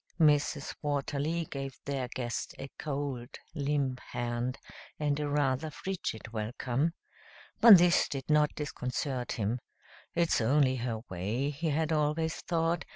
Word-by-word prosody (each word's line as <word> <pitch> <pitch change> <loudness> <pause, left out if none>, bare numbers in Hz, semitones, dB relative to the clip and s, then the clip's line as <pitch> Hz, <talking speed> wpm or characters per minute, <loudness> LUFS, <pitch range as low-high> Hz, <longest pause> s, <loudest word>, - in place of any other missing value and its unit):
Mrs. 150 -2 +3
Watterly 145 +3 -1
gave 135 -2 -6
their 135 -3 -2
guest 120 -3 -3
a 135 - -7
cold, 140 -4 -4 0.2
limp 140 -4 0
hand 120 +2 -3 0.4
and 145 -1 +1
a 150 -1 -1
rather 145 +1 +1
frigid 150 - -5
welcome. 120 +7 -1 0.7
But 225 -4 +11
this 175 0 +4
did 135 -2 -4
not 150 -1 +4
disconcert 130 -3 -3
him. 110 +3 -1 0.6
"It's 170 -7 +2
only 130 +2 +3
her 115 -2 -2
way," 105 +10 -1
he 160 +3 -2
had 155 +2 0
always 155 +1 +1
thought. 165 0 0
140 Hz, 130 wpm, -31 LUFS, 125-155 Hz, 0.7 s, But